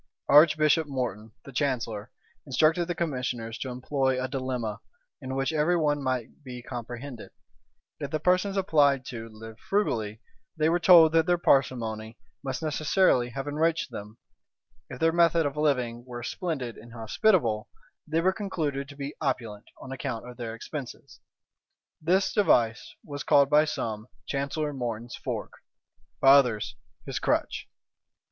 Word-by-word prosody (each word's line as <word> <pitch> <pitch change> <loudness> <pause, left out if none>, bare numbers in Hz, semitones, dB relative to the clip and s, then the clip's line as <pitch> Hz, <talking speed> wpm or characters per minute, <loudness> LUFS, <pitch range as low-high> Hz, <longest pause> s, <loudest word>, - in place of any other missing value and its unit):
Archbishop 155 +1 +5
Morton, 115 -6 -4
the 140 - -9
chancellor, 120 -5 -2 0.4
instructed 155 +6 +3
the 175 - -2
commissioners 125 -7 -3
to 130 - -4
employ 130 +1 0
a 130 - -1
dilemma, 130 -5 -3 0.4
in 130 0 -5
which 135 +4 0
every 160 +3 +2
one 145 -3 +1
might 130 +1 -3
be 125 -2 -8
comprehended: 120 0 -7 0.7
if 145 -2 -4
the 155 - -1
persons 185 +4 +2
applied 145 -8 +3
to 115 -2 -7
lived 110 +1 -11
frugally, 110 - -1 0.4
they 155 0 +3
were 175 +1 +2
told 170 -3 +8
that 165 0 +3
their 175 0 +3
parsimony 115 -8 +1 0.3
must 135 +1 -4
necessarily 155 -4 +2
have 135 +3 -5
enriched 160 +3 0
them; 105 +2 -8 0.7
if 125 - -7
their 165 0 +3
method 170 -1 +3
of 145 0 -2
living 125 -6 0
were 120 -1 -8
splendid 135 -5 -4
and 115 +1 -14
hospitable, 115 - +1 0.4
they 160 +2 +1
were 190 +2 +3
concluded 155 -9 -3
to 140 - -11
be 140 0 -5
opulent 115 -8 -2
on 130 - -9
account 130 -3 -4
of 125 - -9
their 115 -2 -5
expenses. 135 +3 -8 0.8
This 185 +5 +2
device 120 - +2
was 145 -1 -6
by 145 +2 +5
some 110 -7 -3
called - - -34
Chancellor 140 +2 -2
Morton's 120 -2 -4
fork, - - -5 0.7
by 135 - +5
others 120 -5 +4 0.3
his - - -3
crutch. - - -1
135 Hz, 145 wpm, -27 LUFS, 120-155 Hz, 0.8 s, told